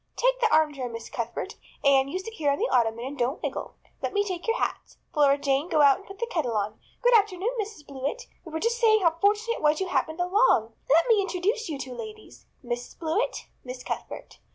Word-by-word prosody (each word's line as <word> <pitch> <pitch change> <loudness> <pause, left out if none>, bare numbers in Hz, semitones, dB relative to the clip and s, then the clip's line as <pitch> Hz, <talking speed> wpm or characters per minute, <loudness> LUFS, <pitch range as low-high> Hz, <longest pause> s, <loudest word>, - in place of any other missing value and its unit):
Take - - +2
the 455 -2 +2
armchair, 295 -5 +2
Miss 230 -1 -8
Cuthbert. 235 - -4 0.3
Anne, 275 -1 +5
you 290 - -3
sit 450 +4 -7
here 305 -9 0
on 280 - 0
the 465 - 0
ottoman 235 -1 +1
and 280 +2 -6
don't 245 +2 0
wiggle. - - -4 0.3
Let - - -2
me 405 0 +2
take 365 0 -4
your 455 +2 +2
hats. - - -3 0.2
Flora 285 -2 +4
Jane, 280 +3 0
go 305 - +3
out 280 -2 +6
and 395 - -17
put 390 - -10
the 470 - -1
kettle 305 - -1
on. 210 +1 -2 0.2
Good - - +6
afternoon, 410 0 +2
Mrs. 405 -8 -8
Blewett. 280 - -4 0.2
We 330 - -10
were 320 - -2
just 470 +4 0
saying 435 -2 +5
how 335 - +5
fortunate 425 +4 +2
it - - -9
was 300 0 +3
you 380 -1 -2
happened 315 -1 -1
along. 360 - +3 0.2
Let 320 +5 +5
me 445 -4 +5
introduce 395 +4 -1
you 300 - -3
two 265 -2 -6
ladies. 430 - -10 0.2
Mrs. 240 0 -5
Blewett, 350 +10 -1 0.2
Miss 250 0 -7
Cuthbert. - - -6
325 Hz, 225 wpm, -26 LUFS, 270-425 Hz, 0.3 s, out